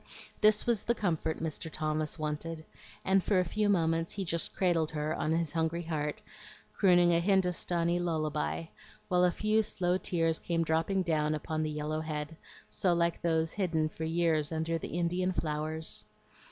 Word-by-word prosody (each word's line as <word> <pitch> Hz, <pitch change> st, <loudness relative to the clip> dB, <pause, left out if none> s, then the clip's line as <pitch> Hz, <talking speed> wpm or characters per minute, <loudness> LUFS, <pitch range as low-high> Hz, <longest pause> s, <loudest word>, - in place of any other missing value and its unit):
This 215 Hz, -1 st, +4 dB
was 235 Hz, -4 st, +1 dB
the 235 Hz, -, +1 dB
comfort 160 Hz, -6 st, -1 dB
Mr. 160 Hz, 0 st, -4 dB
Thomas 155 Hz, 0 st, -2 dB
wanted, 155 Hz, +1 st, -4 dB, 0.4 s
and 190 Hz, 0 st, +3 dB
for 200 Hz, -3 st, +2 dB
a 180 Hz, -, +2 dB
few 210 Hz, +4 st, 0 dB
moments 165 Hz, -3 st, +1 dB
he 195 Hz, -2 st, -3 dB
just 170 Hz, -1 st, -1 dB
cradled 170 Hz, -4 st, +2 dB
her 155 Hz, 0 st, -2 dB
on 155 Hz, -, -1 dB
his 165 Hz, -2 st, 0 dB
hungry 165 Hz, +1 st, 0 dB
heart, 150 Hz, -2 st, -2 dB, 0.5 s
crooning 175 Hz, -3 st, +5 dB
a 170 Hz, -, +4 dB
Hindostanee 175 Hz, -2 st, +1 dB
lullaby, 150 Hz, -, -1 dB, 0.4 s
while 180 Hz, 0 st, +3 dB
a 180 Hz, -, +4 dB
few 215 Hz, +4 st, +2 dB
slow 180 Hz, -3 st, 0 dB
tears 165 Hz, -3 st, 0 dB
came 165 Hz, -1 st, 0 dB
dropping 165 Hz, +4 st, +1 dB
down 155 Hz, -3 st, +1 dB
upon 155 Hz, +1 st, -3 dB
the 155 Hz, -, -1 dB
yellow 150 Hz, +1 st, -2 dB
head, 155 Hz, 0 st, -4 dB, 0.3 s
so 180 Hz, -3 st, +1 dB
like 170 Hz, 0 st, +1 dB
those 160 Hz, -1 st, +1 dB
hidden 165 Hz, -6 st, 0 dB
for 160 Hz, -, -7 dB
years 160 Hz, -2 st, +1 dB
under 165 Hz, +1 st, -1 dB
the 160 Hz, -, -5 dB
Indian 180 Hz, +2 st, 0 dB
flowers. 155 Hz, -1 st, -2 dB
165 Hz, 165 wpm, -31 LUFS, 155-180 Hz, 0.5 s, crooning